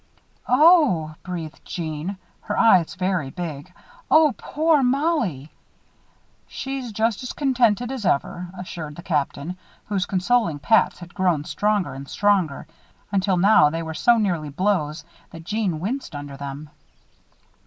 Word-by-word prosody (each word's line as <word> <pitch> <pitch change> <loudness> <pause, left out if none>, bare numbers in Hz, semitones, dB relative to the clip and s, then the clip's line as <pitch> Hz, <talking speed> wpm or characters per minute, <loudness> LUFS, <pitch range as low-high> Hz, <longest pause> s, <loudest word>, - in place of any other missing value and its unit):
"Oh!" 255 - +5
breathed 170 -4 -6
Jeanne, 165 +3 -5 0.2
her - - -4
eyes 185 -8 +4
very 180 -6 -1
big. 165 +1 -6 0.4
"Oh, 310 -3 +5
poor 310 +6 +1
Mollie!" 250 - 0 1.0
"She's 265 -3 -5
just 220 +1 0
as 255 - -5
contented 245 -4 +1
as 260 -4 -5
ever," 175 +2 -1
assured 165 -4 -7
the 175 - -10
Captain, 155 +1 -2 0.3
whose 200 -2 -1
consoling 195 -3 +1
pats 215 +10 +2
had 175 -1 -12
grown 180 -6 +1
stronger 205 -1 0
and 135 +1 -9
stronger 195 -9 +1 0.5
until 195 -2 +1
now 180 -5 +5
they 165 +2 -3
were 160 0 -5
so 235 +8 +3
nearly 175 -8 -1
blows, 155 -2 -1 0.2
that 165 -1 -11
Jeanne 195 -3 -1
winced 215 - -4
under 145 -1 -7
them. 140 +2 -7
185 Hz, 130 wpm, -23 LUFS, 155-225 Hz, 1.0 s, Oh